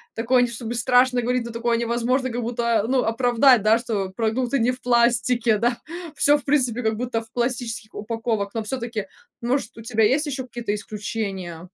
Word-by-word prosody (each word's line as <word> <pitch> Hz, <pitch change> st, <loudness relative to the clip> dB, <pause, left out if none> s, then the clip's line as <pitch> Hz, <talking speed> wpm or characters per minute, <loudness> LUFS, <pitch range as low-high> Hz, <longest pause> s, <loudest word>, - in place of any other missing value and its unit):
такое 245 Hz, +2 st, +2 dB
не 245 Hz, -, +3 dB
то 235 Hz, -, -7 dB
чтобы 235 Hz, -1 st, -5 dB
страшно 250 Hz, +1 st, +3 dB
говорить 245 Hz, 0 st, 0 dB
но 235 Hz, -, -6 dB
такое 230 Hz, 0 st, 0 dB
невозможно 240 Hz, +3 st, 0 dB
как 240 Hz, +1 st, -3 dB
будто, 235 Hz, -1 st, 0 dB
а, -, -, -6 dB
ну 260 Hz, 0 st, +2 dB
оправдать, 245 Hz, +1 st, +4 dB
да, 220 Hz, +1 st, +5 dB
что 215 Hz, -5 st, -2 dB
продукты 240 Hz, +3 st, 0 dB
не 240 Hz, +2 st, +2 dB
в 255 Hz, 0 st, -9 dB
пластике, 235 Hz, -2 st, +2 dB
да, 235 Hz, +1 st, +1 dB, 0.4 s
всё 290 Hz, +1 st, +4 dB
в -, -, -11 dB
принципе 250 Hz, -4 st, +1 dB
как 220 Hz, 0 st, +1 dB
будто 240 Hz, -2 st, -2 dB
в 225 Hz, -, -16 dB
пластических 240 Hz, -3 st, -3 dB
упаковок, 220 Hz, -1 st, -3 dB
но 225 Hz, -, -1 dB
всё-таки 230 Hz, -3 st, -4 dB, 0.4 s
может 240 Hz, -1 st, -2 dB
у -, -, -8 dB
тебя 225 Hz, -2 st, +2 dB
есть 275 Hz, +8 st, +2 dB
еще 270 Hz, -3 st, -3 dB
какие-то 240 Hz, -4 st, -4 dB
исключения? 205 Hz, -5 st, -5 dB
235 Hz, 195 wpm, -23 LUFS, 225-250 Hz, 0.4 s, да